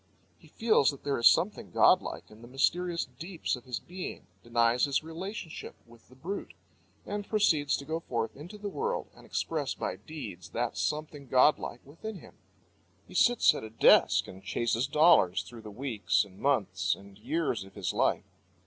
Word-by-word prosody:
He - - -18
feels 220 - +3
that 140 - -6
there 140 -3 0
is 115 - +7
something 185 +6 0
godlike - - +3
in 105 +1 -15
the 120 - -11
mysterious 170 +7 0
deeps 160 +8 -4
of 125 0 -13
his 125 -2 -3
being, 180 +1 -7 0.2
denies 120 +1 +2
his 140 +1 0
relationship 170 +2 -7
with 115 0 -20
the 130 - -17
brute, 180 +10 -6 0.5
and 205 0 -5
proceeds 160 -10 +2
to 140 - -8
go 160 +2 -2
forth 115 -8 -3
into 175 +9 -10
the 205 0 -5
world 470 - -3
and - - -16
express - - -2
by - - -3
deeds 105 - -8
that 120 0 -1
something 150 -2 -3
godlike 130 -1 +3
within 185 +9 -8
him. - - -14 0.7
He - - -14
sits 245 -1 +5
at - - -6
a 110 - -7
desk 110 - +5
and 95 +1 -11
chases 115 +6 0
dollars 150 - +5
through 120 -2 -11
the 110 - -9
weeks 115 -2 0
and 95 -1 -17
months 95 -10 +1
and 100 0 -15
years 145 -5 -1
of 95 0 -16
his 95 -3 -2
life. - - +1
140 Hz, 175 wpm, -30 LUFS, 115-170 Hz, 0.7 s, is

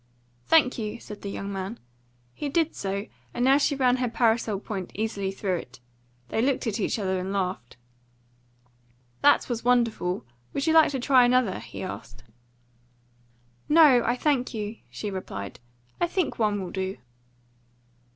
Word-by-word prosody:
"Thank 300 -7 +4
you," 215 +1 -4
said 210 -2 -10
the 200 - -5
young 200 0 -5
man. 195 +4 -5 0.5
He 295 - -4
did 325 +2 +1
so, 200 +1 -3 0.3
and 245 - +1
now 270 +2 +6
she 285 0 +2
ran 255 -2 +3
her 250 -1 0
parasol 225 -3 +1
point 195 -3 -5
easily 200 -2 -2
through 195 -2 -1
it. 130 -5 -10 0.5
They 220 - 0
looked 265 +1 +1
at 225 -1 -1
each 205 - 0
other 190 -3 -1
and 185 +1 -4
laughed. 185 -11 -3 1.4
"That 290 - +5
was 235 -2 -3
wonderful. 230 -7 +1 0.3
Would 275 - -1
you 320 - +3
like 320 -1 +7
to 265 - -1
try 255 0 +5
another?" 245 -4 +2
he - - -8
asked. 125 -9 -8 1.5
"No, 295 -6 +7
I 240 - +1
thank 255 -3 0
you," 215 +1 -4
she 210 - -5
replied. 100 - -6 0.4
"I 345 - +2
think 355 -5 -1
one 205 -3 +1
will 180 - -6
do." 190 0 -3
225 Hz, 160 wpm, -26 LUFS, 195-255 Hz, 1.5 s, like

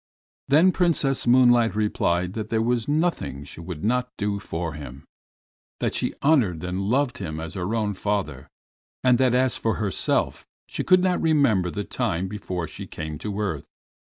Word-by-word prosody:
Then 160 +7 +5
Princess 160 -8 +1
Moonlight 120 -2 +5
replied 90 -4 0
that 110 -1 -5
there 110 - +1
was 120 -1 0
nothing 150 - -1
she 75 - -11
would 85 -2 -7
not 125 +3 +1
do 100 -1 -1
for 85 -4 -4
him, 70 -2 -9 0.7
that - - -1
she - - -1
honored 120 - +3
and 90 +2 -2
loved 125 +6 0
him 80 -5 -4
as 80 0 -6
her 95 +3 -2
own 105 -2 0
father, 95 -9 -3 0.6
and 125 -1 +4
that 130 -2 +3
as 130 0 +2
for 110 - 0
herself 105 -3 -1 0.2
she - - -3
could 185 0 +4
not 185 -1 +1
remember 140 - +3
the 105 +3 -3
time 90 -1 -2
before 95 -4 -4
she - - -9
came 75 -1 -6
to 105 -1 -4
earth. 95 -9 -3
105 Hz, 170 wpm, -24 LUFS, 90-125 Hz, 0.7 s, Then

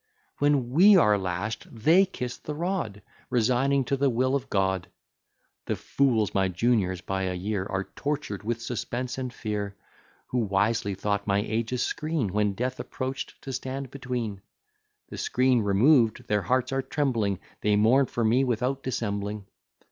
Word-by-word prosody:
When 145 -4 +2
we 190 +8 +7
are 105 - +5
lash'd, 95 +2 -3
they 165 - +4
kiss 125 -9 -5
the 150 - -6
rod, 160 - -3 0.3
Resigning 130 +3 +2
to 140 - 0
the 140 0 +2
will 130 +2 +1
of 140 -3 -1
God. 95 -2 0 0.8
The - - 0
fools, 120 -7 +1
my 95 -1 +2
juniors 95 -1 +1
by 95 0 -2
a 90 0 -2
year, 95 +1 -2
Are 95 -1 -2
tortur'd 140 -5 -4
with 115 +2 -3
suspense 125 +2 -3
and 130 -1 -3
fear; 105 -3 -4 0.5
Who 125 - 0
wisely 100 0 +1
thought 100 +1 -2
my 100 -1 +3
age 115 +1 -2
a 125 - 0
screen, 145 - -1
When 105 -1 +1
death 125 +5 -3
approach'd, 130 +1 -5
to 135 - -5
stand 130 +1 -4
between: 125 -7 -4 0.7
The - - -7
screen 125 -1 +2
removed, 110 +4 +3
their 105 0 +1
hearts 130 +7 0
are 135 0 +1
trembling; 120 -9 0 0.2
They 105 0 +3
mourn 120 +6 +4
for 120 - -2
me 120 +5 +4
without 130 +2 0
dissembling. 105 -5 -3
115 Hz, 160 wpm, -27 LUFS, 100-130 Hz, 0.8 s, we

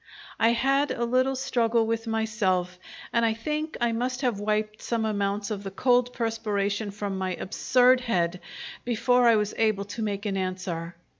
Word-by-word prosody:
I 225 +1 +4
had 275 +4 +2
a 235 - -1
little 255 +2 +2
struggle 235 -3 +1
with 225 +1 -2
myself, 205 -5 0 0.3
and 235 - +3
I 225 -1 +2
think 305 +6 -3
I 240 -1 +2
must 250 +2 -2
have 245 -7 0
wiped 215 0 -1
some 230 -2 -1
amounts 200 0 -1
of 205 -2 -3
the 195 - -5
cold 245 +4 +2
perspiration 215 -3 -1
from 200 -1 -4
my 185 -1 -2
absurd 250 +6 +3
head 180 -7 0 0.4
before 245 +1 +3
I 230 - +6
was 210 -1 0
able 215 -3 +2
to 205 +3 -6
make 205 -1 -2
an 195 -2 -1
answer. 180 -2 -4
220 Hz, 170 wpm, -26 LUFS, 200-240 Hz, 0.4 s, I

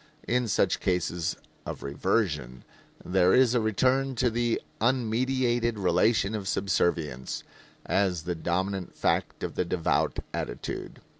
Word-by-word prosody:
In 125 0 +1
such 100 -3 +2
cases 90 -3 0 0.3
of - - -6
reversion 70 - -1 0.4
there 90 0 +4
is 125 -2 +5
a 120 - +3
return 130 +5 +2
to 120 0 +2
the 120 0 +1 0.2
unmediated 120 0 +1
relation 100 +3 +2
of 105 -3 -3
subservience, 85 -9 0 0.4
as 90 -5 +1
the 90 +1 -2
dominant 90 +3 -2
fact - - 0
of - - -3
the - - 0
devout 85 -1 0 0.2
attitude. - - -5
100 Hz, 125 wpm, -28 LUFS, 90-120 Hz, 0.4 s, is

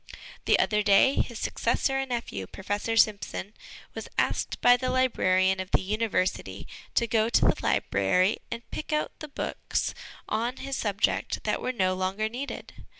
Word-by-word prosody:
The - - +5
other 210 -1 +2
day 205 +6 +5
his 235 -4 -1
successor 270 +4 0
and 270 -1 -3
nephew, 230 - -3
Professor 205 - -3
Simpson, 210 -1 +1 0.4
was - - -6
asked - - 0
by 245 0 +7
the 255 +1 -2
librarian 190 -7 +2
of 185 0 -4
the - - +2
University 200 -1 -1 0.3
to 235 - +3
go 225 -1 +2
to - - +3
the - - +4
library 140 - +2
and 235 - -6
pick 310 - -5
out 300 0 0
the 305 - -6
books 280 - -3 0.3
on 235 +4 -1
his 270 0 -4
subject 205 -4 0
that - - -1
were - - -1
no 185 -6 +1
longer 190 +4 -1
needed. 260 +5 -6
215 Hz, 160 wpm, -27 LUFS, 190-245 Hz, 0.4 s, by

